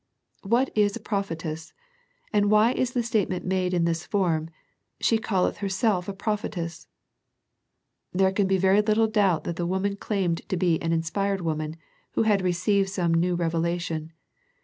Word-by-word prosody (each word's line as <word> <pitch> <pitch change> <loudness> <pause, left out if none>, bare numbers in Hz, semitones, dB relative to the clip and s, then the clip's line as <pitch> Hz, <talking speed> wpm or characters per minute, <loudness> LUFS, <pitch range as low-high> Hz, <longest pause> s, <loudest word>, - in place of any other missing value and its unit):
What 235 +6 +1
is 205 -1 +3
a - - -5
prophetess, 165 -6 -4 0.6
and 205 -1 +3
why 215 +3 +5
is 255 -1 -1
the 245 - +1
statement 205 -5 -1
made 185 -1 0
in 175 -2 +1
this 165 -1 -1
form, 165 -6 0 0.3
*' - - -52
she 225 - +2
calleth 195 -4 0
herself 195 -1 0
a - - -3
prophetess? 195 -5 -4 0.6
" - - -54
There 190 +1 +3
can 195 0 +1
be 190 0 +2
very 190 +2 +4
little 215 +1 +3
doubt 205 -6 +2
that 170 - -4
the 175 - -1
woman 190 +2 -1
claimed 190 -5 -1
to 185 - 0
be 170 -2 +1
an 165 - -1
inspired 190 +4 0
woman, 155 -1 -2 0.4
who - - +2
had 210 -3 +3
re 180 -1 +1
ceived 195 +2 +1
some 180 -4 0
new 175 +2 +2
revelation. 165 -1 -2
190 Hz, 170 wpm, -26 LUFS, 170-205 Hz, 0.6 s, why